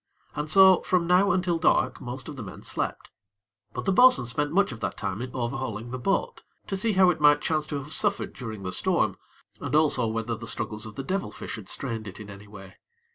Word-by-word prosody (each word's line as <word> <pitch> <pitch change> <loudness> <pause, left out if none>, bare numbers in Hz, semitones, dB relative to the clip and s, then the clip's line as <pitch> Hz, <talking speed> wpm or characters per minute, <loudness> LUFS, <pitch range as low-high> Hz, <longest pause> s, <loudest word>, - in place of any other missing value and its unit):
And 150 +1 -3
so 190 +1 +7
from 180 -2 +1
now 180 +3 +4
until 175 -2 0
dark 160 - +2
most 125 +2 -7
of 150 - -7
the 130 - -7
men 95 -4 -9
slept; - - -3 0.6
but - - -6
the 195 - +2
bo'sun 250 - +6
spent 145 +5 -2
much 200 +3 +2
of 115 - -8
that - - -4
time 100 +1 -4
in 125 - -4
overhauling 120 -2 -4
the 130 - -4
boat, 195 +10 -1 0.2
to 195 - -3
see 215 +3 0
how 185 -1 +5
it 160 -3 -6
might 145 0 +6
chance 155 -1 -1
to 145 - -3
have 145 +3 -5
suffered 205 -1 0
during 110 -5 -7
the 90 - -4
storm, - - +1 0.4
and 140 0 -3
also 145 -6 +3
whether 115 +1 -2
the 115 +1 -7
struggles 110 -1 -3
of 105 - -11
the 135 - -5
devil 190 +7 -2
fish - - -7
had 105 -4 -10
strained 115 -5 -4
it 95 - -9
in 105 -1 -9
any 100 +1 -12
way. 95 -2 -13
135 Hz, 230 wpm, -26 LUFS, 110-175 Hz, 0.6 s, so